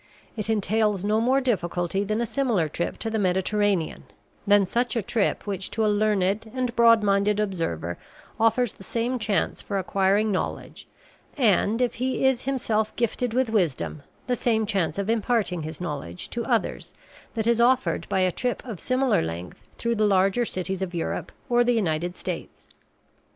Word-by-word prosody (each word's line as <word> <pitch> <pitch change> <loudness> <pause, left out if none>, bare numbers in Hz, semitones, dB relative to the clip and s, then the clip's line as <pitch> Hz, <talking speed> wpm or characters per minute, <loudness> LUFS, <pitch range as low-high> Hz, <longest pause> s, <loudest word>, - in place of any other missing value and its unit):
It 215 -1 -3
entails 210 -2 +1
no 215 +2 +2
more 260 +3 +3
difficulty 185 -5 0
than 215 +3 -1
a - - +1
similar 230 - 0
trip 170 +3 -3
to 225 - -4
the 220 - 0
Mediterranean 190 -1 0 0.4
than 205 -1 +5
such 240 +6 0
a 230 - 0
trip 215 +2 0
which 195 -2 -4
to 220 0 0
a 210 - +3
learned 205 0 +1
and 250 -2 -1
broad 230 -2 +6
minded 200 +1 +2
observer 165 - -2 0.4
offers 225 +1 +2
the - - -14
same 240 +5 -2
chance 215 -2 0
for 200 - -3
acquiring 195 +3 +2
knowledge 185 - -4 0.5
and, 225 -1 +3
if 245 - 0
he 260 +1 0
is 265 -2 +2
himself 225 -5 0
gifted 240 0 -1
with 255 -3 +1
wisdom, 130 - 0 0.2
the 250 - 0
same 220 -2 +1
chance 195 -6 -1
of 200 0 -2
imparting 220 -5 0
his 155 0 -6
knowledge 145 - -5
to 235 - -2
others - - -1 0.4
that 220 -2 -1
is 235 0 +3
offered 255 +2 +2
by 190 - +1
a 185 -1 +3
trip 245 +6 -2
of 220 -8 -6
similar 255 -1 +2
length 85 +6 -6
through 235 0 0
the 215 -2 +2
larger 195 +4 +3
cities 190 -1 -3
of 180 -2 -3
Europe 165 - -3 0.2
or 240 -1 +4
the 245 0 +2
United 175 -5 0
States. - - -6
210 Hz, 170 wpm, -25 LUFS, 185-235 Hz, 0.5 s, broad